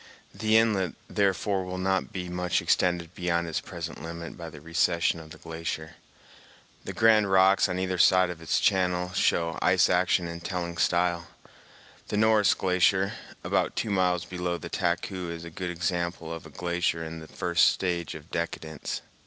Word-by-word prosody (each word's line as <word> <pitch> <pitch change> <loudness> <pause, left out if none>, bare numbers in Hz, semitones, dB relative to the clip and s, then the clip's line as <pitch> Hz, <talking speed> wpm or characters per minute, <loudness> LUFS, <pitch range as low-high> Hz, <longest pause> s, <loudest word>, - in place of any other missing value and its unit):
The 110 0 +3
inlet, 105 -6 +2
therefore, 100 -1 0
will 90 0 -5
not 95 0 0
be 90 -2 -5
much 90 0 0
extended 85 -2 +1
beyond 85 -1 -1
its 80 - -2
present - - -7
limit 85 +1 -7
by 85 -1 -8
the 75 - -11
recession 85 +2 +1
of 80 -1 -12
the - - -11
glacier. 80 -1 -6 0.9
The - - -4
grand 110 -2 +4
rocks 95 +1 +5
on 90 - -2
either 95 -1 -1
side 90 +1 +5
of 85 -2 -9
its 80 - +1
channel 90 -1 +1
show 85 -2 +1
ice - - +4
action 90 - +2
in 85 0 -6
telling 85 -1 -4
style. 85 0 +1 0.8
The 105 - -2
Norris 110 -2 +4
Glacier, 95 +2 +2 0.3
about - - 0
two 110 - -2
miles 90 -3 +1
below 90 -1 -3
the - - -8
Taku 90 0 -2
is 85 0 -6
a 85 - -8
good 90 +2 -4
example 85 -1 -2
of 80 -1 -8
a - - -13
glacier 85 +1 -1
in 80 0 -6
the 80 - -11
first 85 0 +2
stage 85 -3 -1
of 80 +1 -12
decadence. 80 -2 -4
90 Hz, 170 wpm, -27 LUFS, 85-95 Hz, 0.9 s, rocks